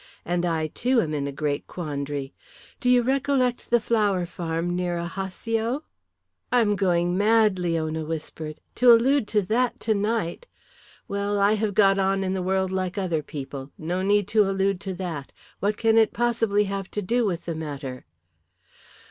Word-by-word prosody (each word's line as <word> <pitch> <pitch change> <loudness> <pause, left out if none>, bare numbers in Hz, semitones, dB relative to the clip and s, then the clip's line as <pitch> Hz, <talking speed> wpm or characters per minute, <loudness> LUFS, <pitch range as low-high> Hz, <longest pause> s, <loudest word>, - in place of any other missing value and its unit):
And 175 0 0
I, 160 -2 0
too, 245 - +1
am 155 -7 0
in 140 -2 -1
a - - -3
great 145 0 -2
quandary. 145 -4 -4 0.5
Do 250 - +1
you 250 -1 +5
recollect 260 -1 +1
the 240 - +4
flower 210 -5 +1
farm 170 0 -3
near 180 -1 -1
Ajaccio?" 220 - -2 0.7
"I 245 -1 +4
am 210 -2 +2
going 175 -2 +1
mad," 210 -1 +3
Leona 160 -2 -1
whispered. 155 0 -6 0.2
"To 250 0 +7
allude 240 +1 +4
to 210 -1 +1
that 240 +6 0
tonight! 215 - -1 0.6
Well, 200 +1 -1
I 200 +1 +4
have 215 -2 -1
got 195 -2 +5
on 195 0 +1
in 190 0 -1
the 190 - -1
world 190 0 0
like 185 0 -2
other 175 -5 0
people. 135 -2 -7
No 175 +4 -2
need 205 0 +2
to 220 0 +4
allude 195 -1 +1
to 190 -2 -4
that. 170 -6 -5 0.3
What 205 +1 0
can 225 0 +4
it 220 - +3
possibly 225 -4 +2
have 195 -1 -4
to 210 - 0
do 235 +6 +1
with 180 -5 -2
the 170 - -2
matter?" 140 - -6
190 Hz, 170 wpm, -25 LUFS, 165-220 Hz, 0.7 s, To